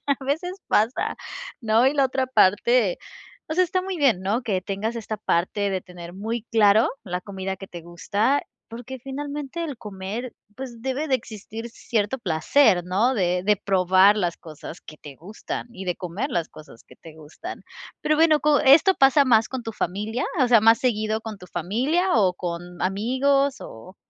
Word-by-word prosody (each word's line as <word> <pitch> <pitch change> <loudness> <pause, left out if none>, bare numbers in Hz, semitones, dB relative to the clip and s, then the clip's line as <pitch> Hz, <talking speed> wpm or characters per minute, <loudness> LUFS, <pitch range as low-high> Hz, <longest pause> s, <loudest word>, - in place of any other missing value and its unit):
a 280 -1 -1
veces 320 +7 -2 0.2
pasa, 220 +4 +1 0.4
¿no?, 225 +1 +3
y 270 - +3
la 275 -2 +3
otra 260 0 -1
parte, 210 -2 +3 0.5
o - - -4
sea, 365 - +4
está 370 +1 -1
muy 375 -2 -4
bien, 245 -10 +3
¿no?, 210 +6 0
que 195 -7 -2
tengas 205 +5 -3
esta 215 -2 -5
parte 200 +2 0
de 190 -2 -2
tener 175 -1 -11
muy 220 +3 -4
claro 215 0 +5 0.2
la 180 -1 -3
comida 190 -1 -5
que 195 - -10
te 175 -2 -9
gusta, 205 +10 0 0.3
porque 245 +3 -8
finalmente 285 +4 -5
el 290 -6 -5
comer, 210 +4 -6 0.2
pues, 250 -3 -8
debe 265 +5 -3
de 265 - +3
existir 225 0 -9
cierto 225 +3 -2
placer, 185 - +3
¿no?, 210 +8 +1
de 180 -4 0
de 210 +1 +3
probar 190 +1 +4
las 175 -4 -1
cosas 160 +1 -10
que 155 - -13
te 145 -3 -12
gustan, 205 +6 -7
y 190 - -8
de 180 -2 -2
comer 185 +10 -4
las 170 -9 -1
cosas 150 -7 -15
que - - -16
te 160 -2 -14
gustan, 160 - -9 0.4
pero 305 - +1
bueno, 315 -1 +4
co 295 -1 +3
¿esto 325 +8 +6
pasa 275 +1 +5
más 225 -4 +3
con 260 -3 -5
tu 225 - -5
familia, 210 +7 -3 0.2
o 255 - +5
sea, 235 -3 +6
más 225 +1 +5
seguido 220 -3 0
con 220 -1 -7
tu 180 - -13
familia, 260 - 0
o 195 -6 +3
con 175 0 -6
amigos? 260 +8 +1
o, 180 - -11
220 Hz, 185 wpm, -24 LUFS, 185-265 Hz, 0.5 s, esto